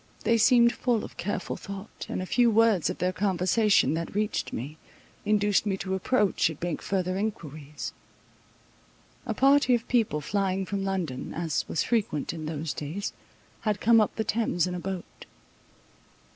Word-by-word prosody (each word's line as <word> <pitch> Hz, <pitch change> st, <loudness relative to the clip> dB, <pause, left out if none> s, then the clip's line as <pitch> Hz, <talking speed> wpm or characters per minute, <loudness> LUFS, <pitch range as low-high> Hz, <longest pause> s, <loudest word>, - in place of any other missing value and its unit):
They 230 Hz, 0 st, +3 dB
seemed 235 Hz, 0 st, +5 dB
full 240 Hz, -3 st, 0 dB
of -, -, -9 dB
careful 205 Hz, -2 st, -3 dB
thought, 200 Hz, +1 st, -8 dB
and 185 Hz, -, -2 dB
a -, -, -4 dB
few 240 Hz, +5 st, +3 dB
words 225 Hz, -6 st, +3 dB
of 180 Hz, -, -4 dB
their 180 Hz, +1 st, 0 dB
conversation 195 Hz, 0 st, +2 dB
that 165 Hz, +3 st, -4 dB
reached 210 Hz, 0 st, -1 dB
me, 140 Hz, +7 st, -6 dB, 0.5 s
induced 205 Hz, -1 st, +2 dB
me 195 Hz, -1 st, 0 dB
to 190 Hz, 0 st, -3 dB
approach 200 Hz, -3 st, +2 dB
and 160 Hz, -, -8 dB
make 175 Hz, -2 st, -3 dB
further 185 Hz, -1 st, -1 dB
enquiries. 155 Hz, -8 st, -5 dB, 1.3 s
A -, -, -2 dB
party 275 Hz, -2 st, +5 dB
of 235 Hz, -, -4 dB
people 225 Hz, -11 st, +1 dB
flying 190 Hz, +4 st, -1 dB
from 195 Hz, 0 st, -3 dB
London, 180 Hz, -9 st, -3 dB
as 165 Hz, -2 st, -1 dB
was 155 Hz, -, 0 dB
frequent 205 Hz, -, -1 dB
in 155 Hz, -2 st, -6 dB
those 155 Hz, -1 st, -3 dB
days, 160 Hz, +8 st, -4 dB, 0.5 s
had 210 Hz, -2 st, -1 dB
come 230 Hz, -1 st, +5 dB
up 210 Hz, -, 0 dB
the 220 Hz, -, -1 dB
Thames 215 Hz, -6 st, 0 dB
in 180 Hz, -, -3 dB
a 180 Hz, -, -3 dB
boat. 185 Hz, 0 st, -7 dB
195 Hz, 165 wpm, -27 LUFS, 170-220 Hz, 1.3 s, seemed